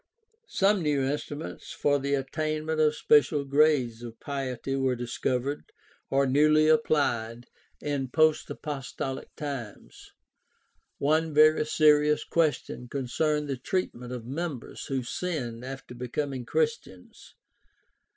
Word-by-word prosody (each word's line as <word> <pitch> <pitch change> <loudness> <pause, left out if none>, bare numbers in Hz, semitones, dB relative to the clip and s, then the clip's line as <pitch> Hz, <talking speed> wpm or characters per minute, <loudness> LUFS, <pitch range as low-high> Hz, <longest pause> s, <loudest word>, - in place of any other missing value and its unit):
Some 195 0 +2
new 145 -4 +1
instruments 145 +2 -4
for 145 -1 +1
the 140 +1 0
attainment 155 +3 -2
of 155 -1 +3
special 150 -1 +3
grades 140 -5 +2
of 115 -1 -9
piety 135 -2 -3
were 135 -2 +1
discovered, 125 +3 -2 0.5
or 140 +1 +3
newly 155 +3 +4
applied, 120 -7 +1 0.3
in 140 -2 -2
post 155 +3 +2
apostolic 135 -2 -5
times. 135 -8 -7 0.9
One 155 +2 +1
very 155 0 +5
serious 150 -1 +4
question 155 -6 -1
concerned 150 +4 -1
the 135 -2 -2
treatment 125 -4 -3
of 125 -3 -6
members 145 -1 -5
who 135 -2 -2
sinned 125 -5 -4
after 135 -1 -8
becoming 125 +1 -4
Christians. 150 - -3
140 Hz, 110 wpm, -27 LUFS, 125-155 Hz, 0.9 s, very